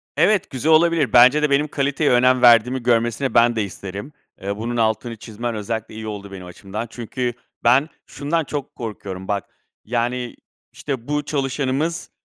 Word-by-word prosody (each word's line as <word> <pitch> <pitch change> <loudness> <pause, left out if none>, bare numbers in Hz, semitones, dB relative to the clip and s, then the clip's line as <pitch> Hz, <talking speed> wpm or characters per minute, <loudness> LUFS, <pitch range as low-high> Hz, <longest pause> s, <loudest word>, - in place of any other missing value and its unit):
Evet 195 +5 +3
güzel 135 +5 0
olabilir. 160 -5 +3
Bence 130 +5 +7
de 150 - +2
benim 140 +2 +2
kaliteye 140 0 0
önem 125 +1 +4
verdiğimi 120 +1 +5
görmesini 120 +2 +1
ben 120 0 +4
de 110 - 0
isterim. 100 +7 -7 0.3
Iıı, 100 +1 -3
bunun 120 +2 -3
altını 115 +1 0
çizmen 115 +2 -5
özellikle 110 +1 -4
iyi 110 0 -6
oldu 100 -2 -7
benim 95 -2 -9
açımdan 100 +5 -7
çünkü 120 +1 -4 0.3
ben 130 +6 +4 0.2
şundan 155 +4 -2
çok 145 -1 -6
korkuyorum 100 -4 -7
bak, 100 -1 -1 0.4
yani, 120 +1 -2 0.4
işte, 130 -5 -5
"Bu 150 0 -1
çalışanımız, 140 +3 -2
120 Hz, 155 wpm, -21 LUFS, 110-140 Hz, 0.4 s, Bence